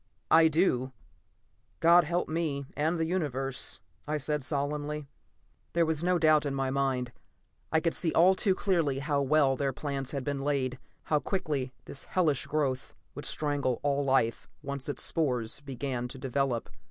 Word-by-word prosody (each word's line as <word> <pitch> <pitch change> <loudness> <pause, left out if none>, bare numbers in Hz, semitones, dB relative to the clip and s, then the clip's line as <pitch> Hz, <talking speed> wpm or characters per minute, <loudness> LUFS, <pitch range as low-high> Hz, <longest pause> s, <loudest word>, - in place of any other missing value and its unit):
"I 165 0 +7
do 140 -6 +1 0.9
God 170 0 +6
help 175 +3 0
me, 155 -4 -2
and 160 +4 +1
the 165 - 0
Universe," 135 -7 -1 0.3
I 155 0 0
said 150 0 -2
solemnly. 145 +1 -2 0.7
There 170 0 +3
was 160 0 0
no 180 0 +3
doubt 155 -2 +4
in 140 -2 -2
my 135 -1 0
mind. 130 -3 0 0.6
I 160 - +3
could 165 0 +1
see 165 - 0
all 180 +3 +6
too 190 0 +1
clearly 170 -9 +1
how 140 0 0
well 140 -1 +3
their 135 0 -1
plans 140 -1 -4
had 140 -2 -3
been 140 -1 -2
laid; 135 -3 -1 0.2
how 150 - +1
quickly 150 -8 -2
this 135 - -7
hellish 155 -7 +1
growth 140 -4 -1 0.2
would - - -7
strangle 145 -5 0
all 145 0 +1
life, 130 -4 +1
once 140 0 -4
its 145 - -1
spores 125 -7 0
began 130 -2 -3
to 125 - -9
develop. 135 -2 -1
145 Hz, 165 wpm, -29 LUFS, 135-160 Hz, 0.9 s, I